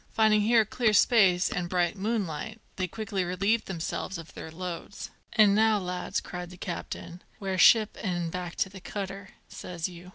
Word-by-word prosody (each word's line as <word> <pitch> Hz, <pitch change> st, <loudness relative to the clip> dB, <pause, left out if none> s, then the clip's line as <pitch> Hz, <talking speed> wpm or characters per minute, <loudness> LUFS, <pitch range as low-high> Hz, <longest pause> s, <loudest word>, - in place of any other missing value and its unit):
Finding 215 Hz, -1 st, +4 dB
here 225 Hz, +2 st, +5 dB
a -, -, -1 dB
clear 220 Hz, +1 st, +1 dB
space 195 Hz, -5 st, +5 dB
and 175 Hz, -1 st, -3 dB
bright 175 Hz, 0 st, +1 dB
moonlight, 210 Hz, -1 st, -3 dB, 0.2 s
they 185 Hz, -1 st, -1 dB
quickly 200 Hz, 0 st, -3 dB
relieved 195 Hz, +6 st, 0 dB
themselves 185 Hz, +1 st, -4 dB
of 165 Hz, -1 st, -11 dB
their -, -, -8 dB
loads. 180 Hz, +3 st, -6 dB, 0.2 s
"An' 210 Hz, -3 st, +6 dB
now, 220 Hz, +1 st, +4 dB
lads," 180 Hz, 0 st, -2 dB
cried 180 Hz, -1 st, -7 dB
the 180 Hz, -, -12 dB
captain, 175 Hz, 0 st, -6 dB, 0.2 s
"wear 195 Hz, -2 st, -2 dB
ship 220 Hz, +2 st, +6 dB
an' 175 Hz, -4 st, -1 dB
back 180 Hz, -1 st, -5 dB
to 190 Hz, -, 0 dB
the 190 Hz, 0 st, -11 dB
cutter, 195 Hz, 0 st, -6 dB
says 170 Hz, -2 st, -5 dB
you. 180 Hz, 0 st, -11 dB
190 Hz, 175 wpm, -28 LUFS, 180-215 Hz, 0.2 s, An